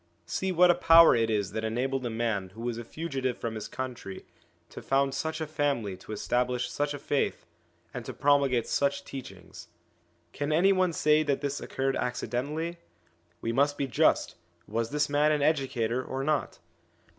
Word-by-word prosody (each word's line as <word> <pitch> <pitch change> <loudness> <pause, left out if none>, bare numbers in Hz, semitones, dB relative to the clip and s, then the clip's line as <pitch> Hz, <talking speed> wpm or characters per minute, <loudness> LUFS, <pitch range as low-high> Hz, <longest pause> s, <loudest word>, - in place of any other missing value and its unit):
See 190 0 -2
what 180 0 +6
a - - +4
power 165 -2 +7
it 115 -1 +1
is 105 -4 0
that 110 - -3
enabled 130 +4 -1
a - - -3
man 110 -4 -2
who 115 - -9
was 120 -1 -3
a - - -6
fugitive 135 -2 -3
from 115 -1 -4
his 110 -1 -5
country 120 -7 -6 0.4
to - - -9
found 135 0 +1
such 160 +3 -3
a 160 - -2
family 140 -10 -1
to 95 - -12
establish 125 +3 -1
such 145 0 -1
a - - -5
faith, 145 0 -1 0.5
and 125 - -5
to - - -6
promulgate 140 -4 +3
such 140 0 0
teachings. 95 -9 -10 0.7
Can 145 +1 -2
any 180 +6 +4
one 185 -2 +2
say 155 0 +3
that 145 -3 0
this 140 -1 -3
occurred 135 0 -1
ac 125 0 -2
cidentally? 155 +7 -3 0.6
We 115 - -1
must 140 +4 +2
be 140 - 0
just: 130 - +2 0.3
was 115 +1 -2
this 145 0 +1
man 145 +1 +3
an 150 -2 +1
educator 130 -5 0
or 135 +1 -4
not 150 +1 -1
135 Hz, 180 wpm, -28 LUFS, 120-150 Hz, 0.7 s, power